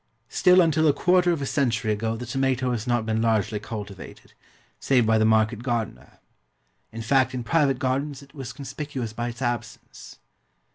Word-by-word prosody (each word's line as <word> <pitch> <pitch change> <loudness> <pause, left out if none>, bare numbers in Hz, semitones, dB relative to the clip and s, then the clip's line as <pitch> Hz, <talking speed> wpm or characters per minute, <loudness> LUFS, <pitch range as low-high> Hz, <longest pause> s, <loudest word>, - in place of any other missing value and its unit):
Still 180 0 +5
until 160 -2 +3
a 145 - +5
quarter 180 +2 +3
of 155 -5 -1
a - - -1
century 115 -6 0
ago 110 +2 -2
the 125 - -6
tomato 130 0 0
has 115 -2 -3
not 120 -2 +1
been 110 0 0
largely 110 -2 +1
cultivated, 105 -3 -9 0.5
save 125 -4 +2
by 110 0 +3
the 110 - +3
market 110 +1 +2
gardener; 115 - -4 0.7
in 115 0 -6
fact 130 +2 +2
in 125 - -3
private 140 0 +2
gardens 135 +1 -2
it 140 0 -19
was 135 -4 -7
conspicuous 135 -3 -6
by 120 +1 -3
its 120 +2 -7
absence. 120 -1 -5
120 Hz, 175 wpm, -25 LUFS, 110-140 Hz, 0.7 s, Still